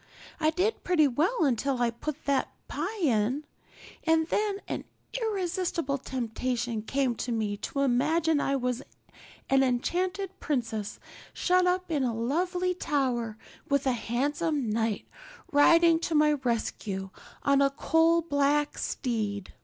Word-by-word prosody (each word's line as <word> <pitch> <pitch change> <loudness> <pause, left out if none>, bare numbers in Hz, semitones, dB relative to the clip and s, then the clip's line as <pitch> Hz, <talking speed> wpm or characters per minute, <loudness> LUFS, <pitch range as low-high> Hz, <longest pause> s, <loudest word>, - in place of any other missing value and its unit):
I 310 -1 +3
did 370 +7 0
pretty 320 -5 +4
well 325 - +1
until 265 0 0
I 240 -1 +2
put 295 +6 -6
the 280 -2 +2 0.2
pie 375 +9 -4
in, 255 +2 +1 0.6
and 320 0 +3
then 415 -2 0
an - - -4 0.3
irresistible 365 - -1
temptation 245 -2 -2
came 265 +3 0
to 245 - -3
me 215 -3 -1
to 275 +6 -3
imagine 300 +4 +2
I 275 - +1
was 250 -1 -1 0.7
an 270 0 +4
enchanted 360 +9 -1
princess 225 -7 -2 0.3
shut 365 0 +3
up 365 -1 0
in 295 -3 +1
a 240 -3 0
lonely 355 - 0
tower 250 - -1 0.3
with 280 -1 +2
a 265 - +3
handsome 270 +3 -1
knight 225 -1 -1 0.4
riding 330 +3 +6
to 330 -1 -2
my 300 0 +5
rescue 220 -7 -2 0.3
on 280 0 +4
a 275 - +5
coal 325 +4 +3
black 290 -1 +1
steed. 210 -6 -2
280 Hz, 135 wpm, -28 LUFS, 240-335 Hz, 0.7 s, riding